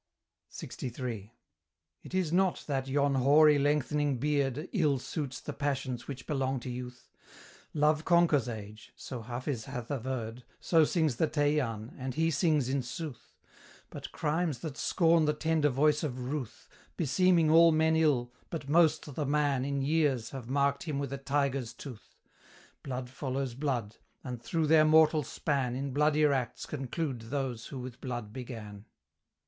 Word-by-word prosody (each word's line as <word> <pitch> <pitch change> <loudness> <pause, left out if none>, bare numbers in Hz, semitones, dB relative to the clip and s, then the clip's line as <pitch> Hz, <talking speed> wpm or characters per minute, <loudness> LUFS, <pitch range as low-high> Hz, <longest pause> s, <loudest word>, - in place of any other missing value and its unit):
LXIII. 120 -4 -6 0.7
It - - -12
is 175 -4 0
not 185 -1 +2
that 135 -2 -2
yon 140 +1 +2
hoary 145 +3 +5
lengthening 145 -1 +1
beard 145 +2 0
Ill 155 - +2
suits 135 0 -4
the - - -6
passions 135 -4 -3
which 135 -2 -7
belong 135 -3 -1
to 125 - -5
youth: 125 0 -8 0.7
Love 150 +1 +3
conquers 165 -8 +3
age 105 -1 -9
so 125 -3 -7
Hafiz 120 +1 -4
hath 125 -3 -6
averred, 125 -3 -4 0.2
So 165 -2 +4
sings 155 -7 +1
the 160 - +2
Teian, 145 -7 0
and 130 -1 -4
he 165 +1 +2
sings 150 -3 +2
in 135 +1 0
sooth 130 +1 -7 0.6
But - - -8
crimes 155 -1 -1
that 155 -4 -5
scorn 165 -1 +3
the 150 - +2
tender 160 -1 +2
voice 150 +3 +2
of 135 -5 -3
ruth, 130 0 -5 0.3
Beseeming 165 +2 +3
all 165 +1 +7
men 160 0 +3
ill, 135 -7 +2 0.2
but 160 -4 -5
most 155 -1 +3
the 145 0 -2
man 145 -2 +1
In 140 0 -1
years, 140 -6 +1
have 130 -3 -7
marked 140 +1 +1
him 150 -4 -2
with 140 -1 -3
a 140 - -4
tiger's 135 -3 -1
tooth: 125 -7 -11 0.6
Blood 130 -2 -4
follows 135 0 -3
blood, 120 -6 -2 0.3
and 125 -3 -6
through 160 +6 0
their 155 0 +6
mortal 155 0 +5
span, 135 -3 -1
In 135 0 -3
bloodier 150 0 +3
acts 125 -4 -2
conclude 135 -2 -3
those 130 -4 -3
who 135 - -7
with 125 0 -8
blood 120 -5 -5
began. 110 -5 -8
140 Hz, 155 wpm, -30 LUFS, 125-155 Hz, 0.7 s, all